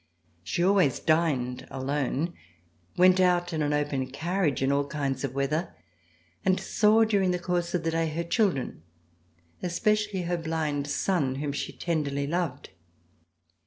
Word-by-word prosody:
She 170 - -1
always 185 -8 +3
dined 135 -6 0
alone, 140 +4 -2 0.6
went 185 +1 +6
out 175 -1 +2
in 155 - -1
an 145 -1 +1
open 145 -3 0
carriage 160 0 -1
in 135 - +2
all 140 0 +1
kinds 135 -2 -2
of 135 -2 -3
weather, 150 +5 -1 0.7
and 185 0 +2
saw, 215 +3 +4
during 200 -4 +2
the 180 - +1
course 175 0 -1
of 170 - -1
the 165 - 0
day, 165 0 0
her 160 +2 -2
children, 170 - 0 0.8
especially 210 +2 0
her 175 0 -1
blind 155 -3 -2
son 145 -2 0
whom 145 +1 -2
she 140 - -4
tenderly 145 -4 -2
loved. 155 -3 -3
160 Hz, 145 wpm, -27 LUFS, 140-180 Hz, 0.8 s, went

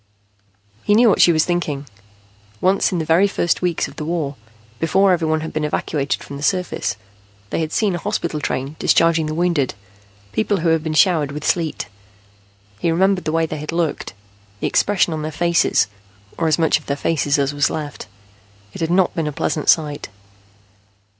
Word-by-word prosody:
He 205 - +3
knew 235 +1 +6
what - - +3
she 175 - +7
was 155 -1 +2
thinking. 155 -5 -2 0.7
Once 190 +2 +2
in 180 - -1
the 160 - -2
very 170 +5 +4
first 175 -3 0
weeks 175 -2 0
of - - -14
the - - -4
war, 155 -4 -2 0.4
before 190 +4 +3
everyone 160 -2 0
had 160 - -6
been 155 - -2
evacuated 150 -1 -1
from 140 - -8
the - - -9
surface, 180 -7 -1 0.6
they - - -1
had 160 -1 -2
seen 210 -4 +1
a 175 - -2
hospital 165 -2 -2
train 140 0 -3
discharging 165 -1 +3
the 155 - -3
wounded, 170 -6 0 0.6
people 205 - 0
who 165 - +2
had 160 -1 +2
been 155 -1 -2
showered 155 -5 +3
with 150 +1 -6
sleet. 165 -3 -1 0.9
He 165 - 0
remembered 185 +3 +2
the 155 - 0
way 165 0 +1
they 155 -1 -5
had 150 +2 -5
looked, 165 - -2 0.5
the - - -3
expression 190 -4 +2
on 155 - -3
their 155 +1 -4
faces, 170 +2 +2 0.5
or 165 - 0
as 155 - +3
much 160 -2 +3
of 150 - -20
their 140 - -1
faces 150 -1 +1
as 140 0 0
was 145 0 +2
left. 150 -2 -6 0.7
It - - -8
had 165 - 0
not 185 +1 +2
been 165 -2 -2
a - - -1
pleasant 150 +1 -1
sight. 150 - +2
160 Hz, 190 wpm, -20 LUFS, 150-175 Hz, 0.9 s, she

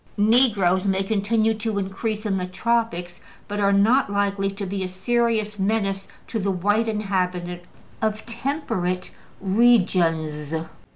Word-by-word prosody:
Negroes 205 -4 +3
may 195 0 +1
continue 220 +2 +1
to 220 -1 -3
increase 210 +3 -3
in 200 -2 0
the 180 - -3
tropics, 185 -4 -1 0.3
but 205 0 -3
are 200 -1 +3
not 210 +4 +3
likely 200 -1 0
to 200 +1 -5
be 195 +1 -3
a 185 - -1
serious 215 +2 0
menace 195 -1 0 0.2
to 225 - -3
the 200 0 -1
white 205 +5 +1
inhabitants 180 -4 -2 0.3
of 220 0 -1
temperate 230 - -2 0.3
regions. 175 -8 +2
200 Hz, 130 wpm, -23 LUFS, 185-220 Hz, 0.3 s, Negroes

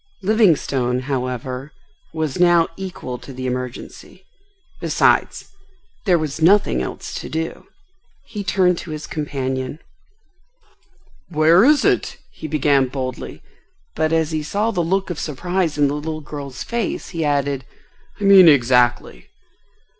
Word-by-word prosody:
Livingstone, 150 - +2
however, 130 +1 -4 0.4
was 160 -3 -3
now 175 -2 +5
equal 175 -10 -6
to - - -11
the 130 0 -6
emergency. 125 -1 -6 0.5
Besides, - - +1 0.6
there 180 -2 +5
was 155 -1 -4
nothing 170 - +4
else - - -6
to - - -8
do. 160 +1 -4 0.6
He 210 -3 -6
turned 180 -2 +2
to - - -9
his 155 -1 -6
companion. 135 -2 -3 1.5
"Where 165 +3 +5
is 295 +3 +4
it?" - - +1
he 155 - -8
began 145 -3 +2
boldly, 130 -1 -6 0.5
but 155 0 0
as 160 -1 +1
he 155 -1 -1
saw 205 +9 -1
the 180 - -1
look 190 +3 -1
of 170 - -5
surprise 170 +2 -2
in 145 -1 +4
the 140 - -2
little 155 +1 -4
girl's 140 -3 -7
face 235 -1 -3
he 165 -3 -3
added, 140 -2 0 0.6
"I - - -5
mean—exactly?" 125 - +5
155 Hz, 130 wpm, -20 LUFS, 130-175 Hz, 1.5 s, now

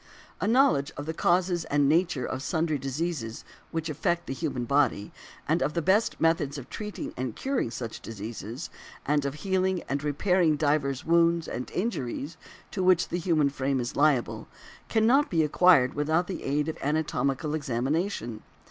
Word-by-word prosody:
A - - -1
knowledge 220 - +3
of 145 - -5
the 160 - -3
causes 175 +1 +1
and 145 -2 +2
nature 160 -4 +2
of 130 - -4
sundry 160 -1 0
diseases 135 -4 -3 0.2
which 165 -1 -3
affect 170 +3 -1
the - - -4
human 135 -4 -3
body, 130 -6 +1 0.4
and 160 +3 +2
of 150 - -1
the 170 - +1
best 205 +7 +2
methods 160 -3 +1
of 135 - -9
treating 210 -1 -5
and 125 -2 -4
curing 270 - -1
such 115 0 -6
diseases, 115 - -7 0.3
and 145 0 +1
of 140 0 -2
healing 190 -1 +1
and 140 +1 -2
repairing 160 +2 +2
divers 145 -3 0
wounds 170 0 +3
and 125 - -5
injuries 155 - -3 0.4
to 190 - -3
which 180 -1 +4
the 175 - -2
human 160 -5 +2
frame 135 -1 -1
is 120 +2 -4
liable, 145 -4 +1 0.4
cannot 240 +7 +3
be 165 -3 +2
acquired 150 -4 +5
without 160 +4 +1
the 185 -1 -5
aid 145 +2 0
of 160 - -4
anatomical 150 0 -1
examination. 135 - -2
150 Hz, 165 wpm, -27 LUFS, 135-175 Hz, 0.4 s, acquired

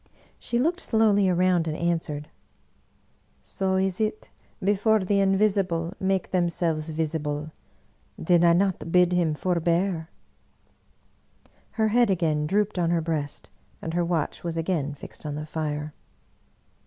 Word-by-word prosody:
She 235 - -2
looked 330 +8 +1
slowly 210 - +3
around 180 -2 +2
and 155 0 -2
an 170 0 +1
swered, 150 -2 -6 0.6
" - - -40
So 190 -1 0
is 190 +1 0
it 215 0 -2 0.3
before 205 +3 +2
the 200 +2 +1
Invisible 195 -4 +1
make 190 0 -1
themselves 170 -3 0
visible! 155 -1 -3 0.7
Did 175 0 +3
I 170 -1 +6
not 185 -2 0
bid 180 0 +4
him 170 -4 +1
forbear?" 170 0 0 1.6
Her 220 -1 +1
head 240 +1 +3
again 160 -5 +1
drooped 205 +2 0
on 170 -1 +1
her 170 -1 +1
breast, 155 -3 -4 0.3
and 160 - -5
her 175 0 +1
watch 170 -3 -2
was 170 -1 -3
again 160 -4 -1
fixed - - -11
on 150 -2 -4
the 150 +1 -5
fire. 150 -1 -4
175 Hz, 140 wpm, -25 LUFS, 160-195 Hz, 1.6 s, I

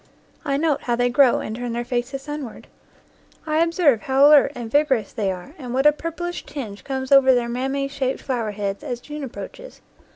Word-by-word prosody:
I 280 -3 0
note 300 -1 +1
how 240 - 0
they 245 +1 +1
grow 255 0 +4
and 220 - -5
turn 240 0 -4
their 240 +1 -3
faces 255 +2 -3
sun 295 0 -5
ward. 235 - -10 0.8
I 310 0 0
observe 330 - +3
how 270 +1 +4
alert 295 -2 +6
and 235 -2 -6
vigorous 270 -8 +1
they 200 -3 -1
are 185 +10 -8
and 250 -3 -5
what 270 +2 +1
a 300 - +8
purplish 335 +3 -5
tinge 215 -8 -7
comes 265 -1 -4
over 265 -2 +7
their 240 -1 0
mammae 270 +3 -2
shaped 275 -2 -2
flower 240 -5 -2
heads, 200 -1 -4
as 245 -1 -4
June 295 +3 -8
approaches. - - -9
265 Hz, 200 wpm, -22 LUFS, 240-290 Hz, 0.8 s, a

